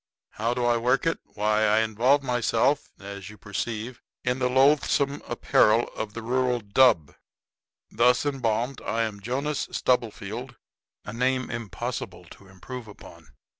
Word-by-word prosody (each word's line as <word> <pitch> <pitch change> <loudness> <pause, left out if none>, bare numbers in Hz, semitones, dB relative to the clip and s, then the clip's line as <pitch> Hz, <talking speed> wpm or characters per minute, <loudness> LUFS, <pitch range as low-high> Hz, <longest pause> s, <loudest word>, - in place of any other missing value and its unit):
How 115 +3 -1
do 125 -1 0
I 120 -1 +3
work 125 +4 +1
it? 165 - 0 0.2
Why, 105 +1 +2
I 105 +1 +4
involve 120 +6 +2
myself, 125 +2 +1
as 100 0 -8
you 105 - -12
perceive, 115 +4 -5 0.2
in 125 +1 0
the 125 -1 +1
loathsome 140 +1 +3
apparel 115 -1 +3
of 110 -1 -5
the 115 - -5
rural 125 +1 +1
dub. 100 - +3 0.8
Thus 125 +4 +3
embalmed 125 -2 -1
I 115 +3 -1
am 105 -2 -4
Jonas 135 +6 -2
Stubblefield 120 0 -1 0.5
a - - -6
name 130 +2 0
impossible 115 -4 -5
to 100 - -15
improve 115 +5 -9
upon. 85 -6 -14
120 Hz, 140 wpm, -26 LUFS, 110-130 Hz, 0.8 s, I